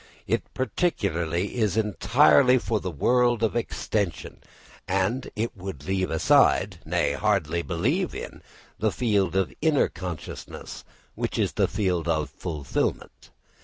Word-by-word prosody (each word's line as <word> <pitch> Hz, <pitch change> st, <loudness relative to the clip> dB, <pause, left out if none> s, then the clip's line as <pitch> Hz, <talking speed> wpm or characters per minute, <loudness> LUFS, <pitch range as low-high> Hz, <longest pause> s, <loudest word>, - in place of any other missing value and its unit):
Its -, -, -1 dB
partiality 100 Hz, -, -1 dB
is 105 Hz, -3 st, +1 dB
entirely 105 Hz, -, +4 dB
for 115 Hz, -3 st, -1 dB
the 95 Hz, -, -4 dB
world 120 Hz, -, +2 dB
of 110 Hz, -, +1 dB
extension, 105 Hz, -5 st, -2 dB, 0.5 s
and 100 Hz, +7 st, 0 dB
it 115 Hz, +2 st, -2 dB
would 90 Hz, -7 st, -7 dB
leave 95 Hz, 0 st, 0 dB
aside 80 Hz, -, +3 dB
nay, 70 Hz, -, +1 dB
hardly 85 Hz, -2 st, 0 dB
believe 130 Hz, -, -1 dB
in -, -, -7 dB, 0.4 s
that 110 Hz, 0 st, +1 dB
field 100 Hz, -7 st, +1 dB
of 95 Hz, -2 st, +1 dB
inner 155 Hz, -3 st, +3 dB
consciousness 85 Hz, -3 st, -7 dB, 0.3 s
which -, -, -3 dB
is -, -, +1 dB
the -, -, +1 dB
field 90 Hz, -5 st, -1 dB
of 80 Hz, -2 st, 0 dB
fulfilment. 75 Hz, -7 st, -3 dB
95 Hz, 130 wpm, -26 LUFS, 85-115 Hz, 0.5 s, entirely